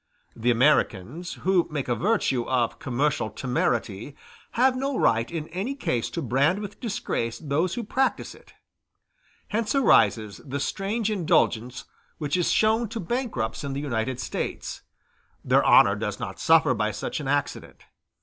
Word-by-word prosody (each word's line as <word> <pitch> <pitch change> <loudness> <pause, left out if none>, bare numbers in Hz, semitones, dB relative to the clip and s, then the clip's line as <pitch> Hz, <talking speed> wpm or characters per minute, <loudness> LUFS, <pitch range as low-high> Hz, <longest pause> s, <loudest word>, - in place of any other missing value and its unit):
The 115 +2 0
Americans, 125 - +1
who 185 -2 +3
make 145 -4 -3
a 120 - +1
virtue 155 - +1
of 125 -3 0
commercial 135 -2 0
temerity, 120 0 -2 0.4
have 255 +2 +3
no 270 0 -2
right 115 0 +2
in 160 -2 -4
any 200 +11 -3
case 125 - -1
to 170 - -4
brand 135 - +2
with 205 -1 -7
disgrace 190 - -3
those 160 +4 -1
who 240 - -3
practise 265 +5 -1
it. - - -19 0.9
Hence 220 +3 -1
arises 110 - +3
the 140 0 -4
strange 205 - -2
indulgence 140 - +1 0.3
which 150 0 -2
is 175 -2 +1
shown 220 +1 +2
to 225 - -5
bankrupts 185 - -3
in 140 -1 -3
the 135 - -3
United 130 -3 -2
States; - - -4 0.6
their - - +4
honor - - +6
does - - -4
not - - -6
suffer - - +4
by - - 0
such - - -4
an - - -5
accident. - - -2
150 Hz, 150 wpm, -25 LUFS, -, 0.9 s, honor